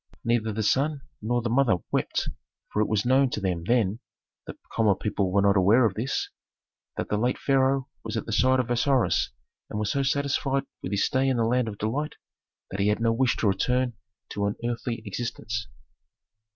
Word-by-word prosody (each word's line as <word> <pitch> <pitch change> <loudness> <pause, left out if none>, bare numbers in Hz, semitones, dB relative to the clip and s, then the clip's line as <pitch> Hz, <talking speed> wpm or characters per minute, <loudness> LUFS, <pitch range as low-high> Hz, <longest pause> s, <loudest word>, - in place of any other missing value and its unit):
Neither 115 -2 +1
the 110 +1 -2
son 140 +6 +1 0.2
nor 120 +2 0
the 120 - -1
mother 125 -4 +4 0.2
wept, - - 0 0.5
for 105 - +2
it 110 - +2
was 110 0 0
known 130 +2 +4
to 115 - -3
them 90 -4 -1
then 115 -2 +2 0.5
(the - - -7 0.2
common 110 -3 +3
people 100 -2 -1
were 100 +1 +3
not 100 0 +4
aware 105 +6 +5
of 105 - +1
this), 115 +7 -2 0.7
that - - -3
the 105 - 0
late 125 +3 +1
pharaoh 135 -1 +2 0.2
was - - -3
at 110 - -3
the - - -5
side 130 +4 +4
of 125 -1 -1
Osiris 125 0 +2 0.4
and - - -4
was 105 -1 0
so 140 - +1
satisfied 140 0 0 0.2
with 90 - -5
his 100 -1 +2
stay 130 +1 +1
in 130 - +1
the 115 - +2
land 125 +1 +1
of 105 -2 -5
delight 140 +9 -2 0.6
that 95 - -4
he 100 - +2
had 105 +1 +2
no 115 0 +2
wish 125 +1 +2
to 110 - +1
return 125 +6 +1 0.4
to 100 0 -1
an 100 - -2
earthly 120 -1 -3
existence. 110 0 -4
115 Hz, 200 wpm, -26 LUFS, 105-130 Hz, 0.7 s, aware